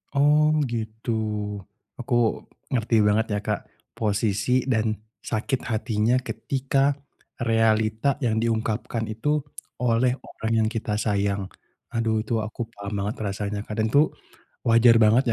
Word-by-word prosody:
Oh 150 +2 +5 0.2
gitu. 110 0 -4 0.9
Aku 120 -2 +1 0.3
ngerti 115 -2 +1
banget 110 +2 +3
ya 105 - +1
Kak - - 0 0.3
posisi 105 +1 0 0.2
dan 110 -3 +1 0.2
sakit 125 +4 -2
hatinya 110 +2 +1
ketika 135 +2 0 0.4
realita 115 +3 +2
yang 120 -6 +1
diungkapkan 115 0 -1
itu 130 +8 0 0.4
oleh 125 +1 +3
orang 110 0 -5
yang 110 - +3
kita 105 -2 -1
sayang. 100 -2 0 0.5
Aduh 115 -1 +1
itu - - -1
aku 110 +1 -5
paham 100 -1 -7
banget 105 +3 -2
rasanya 100 +1 -3
kadang 110 +1 0
tuh 150 +2 +5 0.5
wajar 115 0 +6
banget 110 +4 +5
115 Hz, 120 wpm, -25 LUFS, 110-125 Hz, 0.9 s, wajar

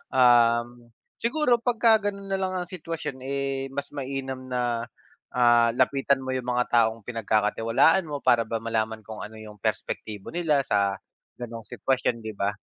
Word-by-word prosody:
Um, 120 -1 +3 0.3
siguro 245 0 +2
pagka 230 -1 +4
gano'n 200 0 -10
nalang 190 -1 -1
ang 180 -1 -3
sitwasyon, 165 -6 -5
eh, 135 0 -2
mas 140 0 -3
mainam 135 -2 -5
na, 120 -2 -1 0.5
ah, 120 -1 +5
lapitan 135 +1 +2
mo 130 - -4
yung 130 -1 -3
mga 125 0 0
taong 115 -1 +2
pinagkakatiwalaan 115 - +2
mo 145 -2 -4
para 115 -1 +4
ba 115 0 -3
malaman 110 -1 -1
kung 110 +1 -9
ano 110 - -14
yung 105 -1 -11
perspektibo 105 +1 -4
nila 160 -4 +1
sa 100 -5 0 0.4
ganong 115 -2 -7
sitwasyon, 125 -3 -1
'di 110 - -5
ba? 100 +1 -1
125 Hz, 150 wpm, -26 LUFS, 115-140 Hz, 0.5 s, ah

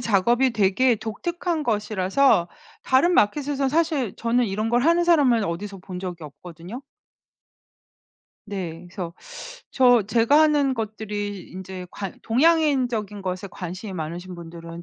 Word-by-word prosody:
작업이 235 +4 +2
되게 230 +3 +3
독특한 320 - -3
것이라서 210 -3 +2 0.3
다른 275 +8 +3
마켓에서 275 +3 +1
사실 305 - 0
저는 235 +1 +1
이런 215 +3 -2
걸 240 +1 +3
하는 340 +4 +3
사람을 275 -10 +4
어디서 195 +3 -4
본 180 -1 -8
적이 180 -3 -6
없거든요. 170 - -10 1.7
네. 180 -4 -6
그래서 175 -2 -6 0.6
저 245 -3 +5
제가 230 +8 +3
하는 290 -4 +3
것들이 205 -3 -5
인제 185 0 -8
관 195 -3 -7
동양인적인 250 - +1
것에 185 +1 -4
관심이 185 +3 -7
많으신 175 +2 -6
분들은 170 0 -9
215 Hz, 285 characters per minute, -23 LUFS, 185-260 Hz, 1.7 s, 저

